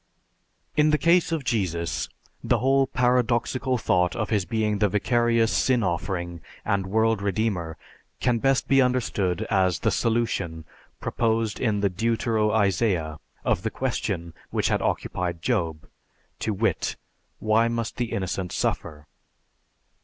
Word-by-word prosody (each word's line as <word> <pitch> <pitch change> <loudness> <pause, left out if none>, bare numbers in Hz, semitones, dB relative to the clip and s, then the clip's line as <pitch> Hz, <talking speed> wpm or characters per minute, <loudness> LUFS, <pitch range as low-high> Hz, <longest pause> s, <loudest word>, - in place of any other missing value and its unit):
In 150 +1 +4
the 150 - +3
case 170 +2 +3
of 160 -3 -1
Jesus, 90 -8 -1 0.3
the - - +2
whole 135 +1 +3
paradoxical 125 +1 +1
thought 90 -5 +1
of 110 -2 -2
his 100 -4 +1
being 105 -2 0
the 105 -1 +3
vicarious 115 +2 +2
sin 125 -3 +2
offering 85 -2 -2 0.2
and 100 -2 0
world 110 +1 +2
redeemer 100 -5 -1 0.4
can 120 -2 +1
best 135 +2 +2
be 135 0 +5
understood 110 -6 0
as 95 -4 +3
the - - +2
solution, 105 -9 -1 0.3
proposed 115 -2 0
in 105 -4 0
the 100 - +2
Deutero 110 +1 +1
Isaiah, 95 -7 +1 0.3
of - - +1
the - - -1
question 85 -1 -3 0.2
which - - 0
had - - +1
occupied 85 -2 -2
Job 80 -2 -1 0.5
to 110 - -1
wit: 110 +3 0 0.4
Why 110 +2 +2
must 115 -1 -3
the 120 -2 -2
innocent 95 -2 -2
suffer? 75 0 -2
110 Hz, 135 wpm, -25 LUFS, 90-120 Hz, 0.5 s, be